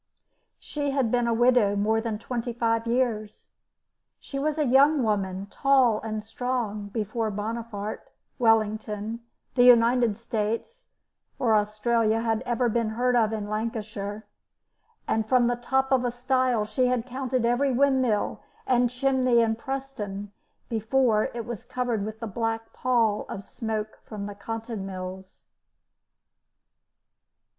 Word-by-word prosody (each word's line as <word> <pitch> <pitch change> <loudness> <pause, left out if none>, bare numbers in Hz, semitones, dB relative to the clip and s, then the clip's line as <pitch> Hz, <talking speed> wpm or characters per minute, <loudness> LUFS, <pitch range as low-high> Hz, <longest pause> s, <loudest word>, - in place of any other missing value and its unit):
She 290 -1 -3
had 270 -5 +1
been 245 -1 +2
a - - +2
widow 235 -3 +4
more 220 +2 +1
than 225 -2 -3
twenty 235 +1 -4
five 230 -1 0
years. 230 -4 -1 0.7
She 275 - -6
was 305 +2 0
a 305 - +2
young 275 +2 +5
woman, 195 -3 -1
tall 260 -6 +3
and 215 -1 -4
strong, 225 -3 -3
before 220 +1 -2
Bonaparte, 215 0 -5 0.3
Wellington, 220 -1 +1 0.3
the 245 - +4
United 235 -2 +5
States, 230 - -3 0.5
or 245 -5 +2
Australia, 215 +1 +1
had 225 -1 0
ever 240 0 +1
been 230 -1 0
heard 245 +3 +1
of 225 -2 +3
in 215 -2 -3
Lancashire, 215 -1 -4 0.8
and 220 0 0
from 250 -2 +4
the 245 0 +2
top 265 +2 0
of 260 -2 +3
a 245 - +1
stile 250 -2 +1
she 250 +4 +1
had 250 -2 0
counted 255 -1 -2
every 250 +4 +2
windmill 260 -4 +1 0.2
and 245 -1 +3
chimney 255 -1 +2
in 225 -1 +2
Preston 230 -6 -5 0.4
before 225 0 +2
it 235 -2 -4
was 235 -2 -6
covered 245 -4 -2
with 215 +1 -6
the - - -2
black 225 +1 -3
pall 230 -4 +1
of 195 - -6
smoke 220 -1 -4
from 210 -2 -6
the 205 - -6
cotton 225 +1 -5
mills. 190 0 -8
230 Hz, 135 wpm, -26 LUFS, 215-250 Hz, 0.8 s, young